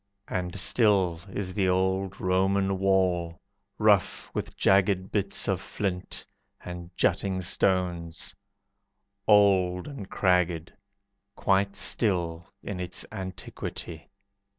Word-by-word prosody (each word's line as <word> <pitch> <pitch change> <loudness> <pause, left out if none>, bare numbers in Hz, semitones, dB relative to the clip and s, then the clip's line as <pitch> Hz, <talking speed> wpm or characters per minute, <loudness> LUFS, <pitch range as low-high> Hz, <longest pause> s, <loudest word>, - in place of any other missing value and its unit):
And 90 +1 -3
still 95 -5 +3
is 95 -2 -4
the 95 -1 +1
old 95 +1 0
Roman 95 +1 +1
wall, 90 -3 +1 0.4
Rough 105 -3 +2
with - - -5
jagged 95 -1 +3
bits 100 -2 0
of 95 -2 0
flint, 95 -3 -4 0.4
And 90 -1 -7
jutting 95 -2 +1
stones, 90 -2 0 0.9
Old 95 -4 +4
and 125 -10 -8
cragged, 90 -2 +1 0.6
Quite 100 +1 +1
still 85 -8 0 0.2
in 100 -3 -5
its 90 0 -4
antiquity. 95 -4 -7
95 Hz, 100 wpm, -27 LUFS, 90-100 Hz, 0.9 s, Old